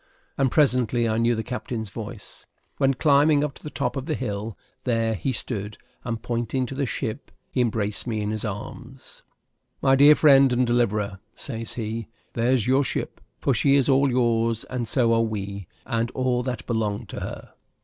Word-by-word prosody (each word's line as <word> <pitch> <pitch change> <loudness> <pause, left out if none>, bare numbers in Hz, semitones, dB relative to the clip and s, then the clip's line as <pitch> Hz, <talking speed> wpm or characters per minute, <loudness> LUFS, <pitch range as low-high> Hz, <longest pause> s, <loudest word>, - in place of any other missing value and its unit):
and 135 -1 +2
presently 125 -5 +2
I 110 0 0
knew 115 +1 +3
the 110 - -3
captain's 115 -3 -5
voice; - - -9 0.3
when, 135 0 +2
climbing 145 +1 +4
up 150 -2 -2
to - - -15
the 150 - -5
top - - -2
of 135 +1 -4
the 155 - 0
hill, 105 -3 -4 0.3
there 115 -2 +1
he 110 +6 -2
stood, 105 -4 -4 0.3
and, 115 -2 -3
pointing 120 +2 -1
to 125 - -6
the 140 0 -1
ship, 115 +3 -4 0.2
he 125 - +1
embraced 110 -2 -1
me 110 -2 -1
in 105 0 -2
his 110 -1 -2
arms. 105 -2 -8 0.6
"My 135 - +4
dear 145 +3 +8
friend 135 -4 +6
and 125 +1 +2
deliverer," 105 -5 0 0.2
says 115 -4 -6
he, 115 -1 -4 0.3
"there's 120 -1 +2
your 130 +3 +3
ship; - - -4 0.2
for 135 - +1
she 135 +4 +3
is 135 -2 +3
all 135 0 +4
yours, 115 -2 +1
and 125 -2 -2
so 115 -1 +3
are 115 - +3
we, 100 -4 -4 0.2
and 115 0 -1
all 130 -1 +1
that 125 -4 -4
belong 110 -1 -1
to - - -7
her." - - -7
120 Hz, 185 wpm, -24 LUFS, 110-130 Hz, 0.6 s, dear